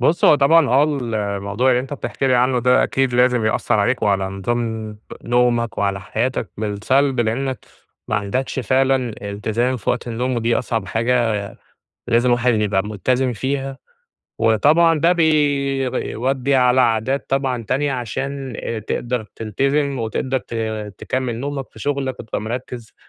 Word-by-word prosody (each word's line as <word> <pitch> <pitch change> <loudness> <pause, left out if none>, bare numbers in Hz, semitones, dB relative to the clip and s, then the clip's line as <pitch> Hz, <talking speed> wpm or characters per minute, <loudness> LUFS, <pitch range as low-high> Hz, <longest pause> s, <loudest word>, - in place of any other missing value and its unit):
بُصّ، 155 +7 +2
هو - - +8
طبعًا 145 +2 +4
آه 135 +4 +4 0.5
الموضوع 100 +6 0
اللي 125 0 +3
أنت 135 +2 -8
بتحكي 135 -1 -3
لي 130 - +3
عنه 125 +1 +3
ده 125 +1 +4
أكيد 135 -2 0
لازم 125 -2 +3
يأثرعليك، 110 +3 +1
وعلى 100 -2 +2
نظام 110 +2 -3 0.2
نومك، 120 -1 +1
وعلى 100 -1 0
حياتك 115 +4 -2
بالسلب، 120 +6 +1
لأنك 130 +3 -2 0.4
ماعندكش 105 +7 -2
فعلًا 130 0 +1 0.2
إلتزام 115 +5 -1
في 100 - -2
وقت - - -2
النوم، 125 +2 -2
ودي 115 0 +1
أصعب 115 -5 -2
حاجة 115 +1 +1 0.7
لازم 120 +1 +3
الواحد 120 0 +3
يبقى 105 -3 +1
مُلتزم 125 +5 0
فيها، 135 +3 -3 0.6
وطبعًا 150 +9 +4
ده 170 +3 +4
بي 145 -5 +1
بيودَّي 135 +3 -1
على 125 0 +4
عادات 120 +3 +1
طبعًا 135 -3 0
تانية، 140 +6 0
عشان 135 +2 -4
آآ، 115 - -4
تقدر 120 +2 -3
تلتزِم 135 +5 0
وتقدر 130 +4 -1
ت 120 - -10 0.4
تكمل 130 -3 -2
نومك 140 -1 -4
في - - -15
شغلك 140 -3 -2
وتبقى 110 - -4
مرّكز، 120 +1 -6
125 Hz, 145 wpm, -20 LUFS, 110-135 Hz, 0.7 s, هو